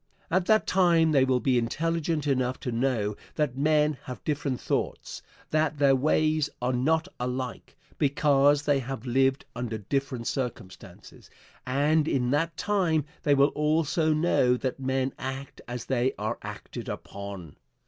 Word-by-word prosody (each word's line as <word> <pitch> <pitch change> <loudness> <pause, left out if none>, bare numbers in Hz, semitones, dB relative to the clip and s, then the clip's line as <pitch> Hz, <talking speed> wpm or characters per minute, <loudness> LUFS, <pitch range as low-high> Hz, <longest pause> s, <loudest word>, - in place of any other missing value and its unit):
At 180 +1 +1
that 215 0 +4
time 170 -4 +3
they 140 -3 +4
will 130 -1 +2
be 125 -1 +2
intelligent 160 +5 -1
enough 130 -2 0
to 125 - -3
know 115 -4 0 0.2
that 150 -5 0
men 150 0 +2
have 125 - -8
different 145 -4 -2
thoughts, - - -3 0.3
that 155 -1 +1
their 140 -1 +4
ways 155 +2 +2
are 125 +1 0
not 160 +7 +1
alike, 125 0 -4 0.2
because 145 0 +3
they 145 -2 +2
have 135 0 -6
lived 135 +2 +2
under 120 -2 -3
different 130 +3 -3
circumstances, 120 -9 -6 0.4
and 145 +4 +2
in 125 -4 +1
that 165 +4 0
time 175 -8 +1 0.2
they 145 -1 +3
will 140 +1 +5
also 155 +2 +1
know 150 -6 +3
that 130 +1 -3
men 130 0 -1
act 135 +1 -6
as 120 -1 -5
they 130 0 +1
are 110 +3 -3
acted 105 0 -7
upon. 100 -6 -7
135 Hz, 150 wpm, -27 LUFS, 125-155 Hz, 0.4 s, will